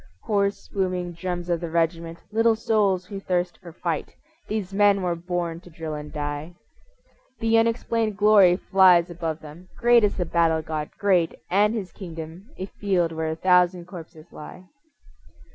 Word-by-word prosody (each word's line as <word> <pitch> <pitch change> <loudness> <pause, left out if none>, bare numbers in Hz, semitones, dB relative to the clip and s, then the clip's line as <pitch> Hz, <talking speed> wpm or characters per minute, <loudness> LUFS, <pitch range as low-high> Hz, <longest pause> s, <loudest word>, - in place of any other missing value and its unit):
Hoarse, 200 -1 -1
booming 185 -2 -2
drums 175 0 -4
of 170 -1 -1
the 170 - -4
regiment, 165 0 -1
Little 225 +1 +3
souls 205 -4 +1
who 200 0 -7
thirst 180 -2 -2
for 175 -2 -11
fight, 165 -1 -4 0.3
These 205 -3 -3
men 200 -1 +3
were 175 -1 0
born 170 -1 -3
to 180 - -16
drill 160 -1 -6
and 150 0 -7
die. 145 +3 -5 0.8
The 225 0 +3
unexplained 225 -2 0
glory 205 -4 +6
flies 180 -3 +4
above 165 -2 -4
them, 155 +5 -13
Great 240 -1 +5
is 205 - +1
the 180 - 0
battle 165 -1 +1
god, 155 -1 -4
great, 185 -5 +2 0.2
and 210 +4 +3
his 190 -6 -4
kingdom 165 +2 -9
A 190 - -4
field 190 -4 -1
where 160 0 -3
a 160 - -2
thousand 180 0 +3
corpses 165 -3 -11
lie. 165 +4 -10
180 Hz, 160 wpm, -24 LUFS, 165-200 Hz, 0.8 s, glory